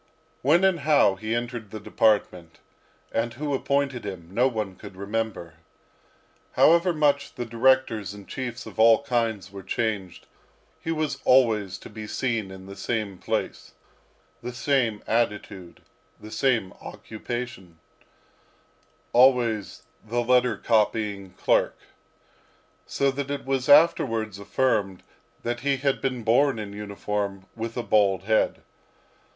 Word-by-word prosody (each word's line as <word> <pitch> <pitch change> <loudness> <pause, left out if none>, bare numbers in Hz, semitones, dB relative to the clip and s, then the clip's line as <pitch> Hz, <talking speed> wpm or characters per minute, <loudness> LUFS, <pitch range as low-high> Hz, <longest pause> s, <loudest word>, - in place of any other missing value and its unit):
When 160 +7 +4
and 190 -3 +3
how 140 -8 +4
he 110 +4 -3
entered 120 -2 -4
the 110 - -7
department, 100 -6 0 0.5
and 115 0 -1
who 145 +2 -3
appointed 140 -2 0
him, 95 -5 -7
no 125 +5 +3
one 110 -6 -3
could 100 -1 -12
remember. 100 -4 -4 1.0
However 170 +3 +5
much 145 -3 +1
the 120 - -4
directors 115 -3 +2
and 100 -1 -11
chiefs 125 -1 -5
of - - -10
all 115 +3 +6
kinds 115 -7 -1
were 100 -1 -8
changed, 100 -3 -3 0.5
he - - -7
was 155 -2 -1
always 110 -7 +3
to - - -12
be 110 -1 -8
seen 115 -4 -2
in 95 0 -11
the 100 +1 -10
same 100 -2 -3
place, - - -4 0.7
the 125 +1 -6
same 120 -5 0
attitude, 105 -5 -2 0.4
the 110 - -11
same 120 -9 0
occupation 115 -6 -7 1.4
always 120 -4 +3 0.2
the 120 +3 -1
letter 125 -2 +3
copying 105 -3 0
clerk - - +1 1.1
so 140 0 +1
that 140 +1 -4
it 140 -1 -4
was 135 0 -1
afterwards 115 - +4
affirmed 100 -4 0 0.4
that 120 0 -2
he 140 +2 0
had 135 +1 0
been 130 -3 -2
born 130 +4 +3
in 105 -2 -6
uniform 100 -1 -4
with 115 +1 -5
a 120 - -1
bald 100 -4 +2
head. 110 +2 +1
115 Hz, 130 wpm, -25 LUFS, 100-130 Hz, 1.4 s, all